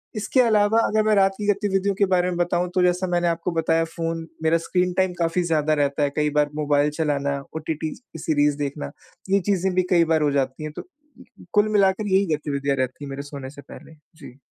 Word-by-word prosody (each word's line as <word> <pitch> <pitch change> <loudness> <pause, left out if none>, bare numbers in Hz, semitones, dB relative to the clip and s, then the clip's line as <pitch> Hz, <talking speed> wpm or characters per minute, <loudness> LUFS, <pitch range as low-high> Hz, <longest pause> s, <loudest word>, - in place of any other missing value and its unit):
इसके 220 +5 +2
अलावा 215 -2 +3
अगर 215 0 +1
मैं 215 0 +3
रात 195 -1 +4
की 210 - -4
गतिविधियों 200 -1 +1
के 200 - +3
बारे 180 0 +2
में 175 - -3
बताऊँ 175 0 0
तो 185 - +3
जैसा 180 +1 +1
मैंने 175 -1 +1
आपको 170 +1 -2
बताया 165 0 +2
फ़ोन 165 -1 -3 0.2
मेरा 160 +1 +3
स्क्रीन 180 0 +1
टाइम 185 0 +1
काफ़ी 170 +1 +1
ज़्यादा 155 -2 +1
रहता 140 +1 0
है। 145 - +2
कई 150 0 +2
बार 145 0 +2
मोबाइल 145 -1 +2
चलाना 140 -2 0 0.2
ओटीटी 160 0 -3
की 240 -9 -14
सीरीज़ 145 -2 +1
देखना। 140 - -4 0.4
ये 200 - +4
चीज़ें 190 -1 0
भी 185 - +3
कई 170 -2 +5
बार 160 - +2
हो 145 - +2
जाती 135 +1 -1
हैं। 155 - -5
तो - - -3 0.4
कु - - -18
कुल 210 0 +4
मिलाकर 200 +1 +2
यही 195 0 +3
गतिविधियाँ 140 -2 -2
रहती 130 +2 -3
हैं - - -8
मेरे 135 +1 -5
सोने 140 -2 -8
से 140 - -12
पहले। 160 +3 -14 0.2
जी। 135 -4 -13
165 Hz, 220 wpm, -23 LUFS, 145-190 Hz, 0.4 s, कई